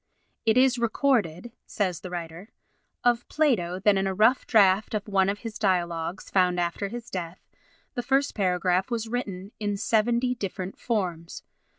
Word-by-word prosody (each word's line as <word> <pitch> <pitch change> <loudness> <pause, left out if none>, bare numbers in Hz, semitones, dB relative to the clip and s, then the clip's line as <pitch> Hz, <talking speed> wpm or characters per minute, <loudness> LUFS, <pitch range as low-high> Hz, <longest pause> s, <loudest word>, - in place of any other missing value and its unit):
"It 220 - +4
is 255 -1 +4
recorded," 235 - 0 0.2
says 185 -6 -1
the 185 - -8
writer, 175 +3 -7 0.5
"of 240 0 +2
Plato, 220 - +1
that 200 0 +4
in 195 0 0
a 190 - -2
rough 225 +6 +3
draft 205 -1 +4
of 210 0 -3
one 195 -2 +2
of 205 +1 -3
his 225 -1 -6
Dialogues, 175 -3 -1
found 180 -2 +3
after 175 +3 -1
his 240 +2 -8
death, 175 -1 -6 0.5
the 245 - -2
first 270 +3 +1
paragraph 185 -1 +1
was 230 -2 -2
written 205 -5 -4
in 205 -1 -1
seventy 235 +4 +1
different 190 -4 -5
forms. 180 -8 -3
200 Hz, 160 wpm, -26 LUFS, 180-235 Hz, 0.5 s, It